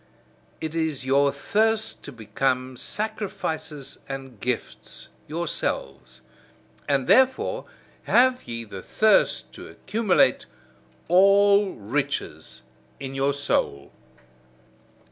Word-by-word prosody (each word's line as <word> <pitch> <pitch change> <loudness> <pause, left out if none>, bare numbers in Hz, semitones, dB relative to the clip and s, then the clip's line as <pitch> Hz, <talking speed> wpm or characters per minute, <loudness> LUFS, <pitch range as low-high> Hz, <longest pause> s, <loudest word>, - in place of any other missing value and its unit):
It 160 -1 -4
is 160 -5 -2
your 140 +1 +3
thirst 220 +9 0
to - - -8
become 130 +3 -2
sacrifices 160 - -4
and 135 -4 -7
gifts 110 - -4 0.2
yourselves: 70 - -3 0.7
and 140 -2 +2
therefore 260 - +3 0.4
have 255 +1 +3
ye 115 0 -5
the 100 -4 -9
thirst 215 - +2
to - - -10
accumulate 210 -1 +1 0.6
all 200 +2 +5
riches 105 - -4 0.4
in 135 -1 -6
your 135 +1 +1
soul. 70 - -1
140 Hz, 90 wpm, -25 LUFS, 125-200 Hz, 0.7 s, all